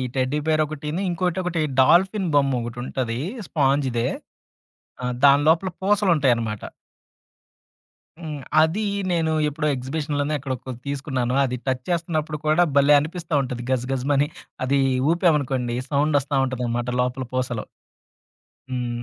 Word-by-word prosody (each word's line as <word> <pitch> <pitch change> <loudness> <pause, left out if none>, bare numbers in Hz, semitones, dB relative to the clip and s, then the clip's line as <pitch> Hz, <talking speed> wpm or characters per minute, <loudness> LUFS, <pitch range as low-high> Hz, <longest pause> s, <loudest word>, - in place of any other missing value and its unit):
Teddy 130 +3 0
beer 155 -1 +3
ఒకటిని. 150 +3 -4
ఇంకోటి 180 +1 -1
ఒకటి 175 -2 -1 0.2
డాల్ఫిన్ 185 +7 +4
బొమ్మ 140 -1 +3
ఒకటి 120 0 -6
ఉంటది 125 -2 -3 0.3
స్పాంజ్‌దే. 135 -5 +1 1.0
ఆ! - - -1 0.2
దాని 140 +1 +6
లోపల 175 +4 +3
పూసలుంటాయన్నమాట. 150 - +2 1.6
హ్మ్. 155 -4 -6 0.2
అది 165 +7 +1 0.3
నేను 165 -2 +1 0.2
ఎప్పుడో 150 +1 -2
ఎగ్జిబిషన్‌లోనే 145 +3 -2
ఎక్కడొ 135 -1 -3
కొ - - -3 0.2
తీసుకున్నాను. 135 -3 -2
అది 125 -2 -1
టచ్ 130 -1 -1
చేస్తున్నప్పుడు 160 -3 -1
కూడా 155 +3 +4
భలే 140 +1 +6
అనిపిస్తా 165 +2 -5
ఉంటది 125 -2 -4
గజ 130 -2 +1
గజమని. 140 +2 +1 0.4
అది 135 +2 +2 0.3
ఊపామనుకోండి, 140 -8 +1
సౌండొస్తా 145 -1 +1
ఉంటదనమాట 120 -2 -2
లోపల 125 +1 -2
పూసలో. 125 -3 -2 1.1
హ్మ్. 120 -2 -3
140 Hz, 120 wpm, -23 LUFS, 130-160 Hz, 1.6 s, దాని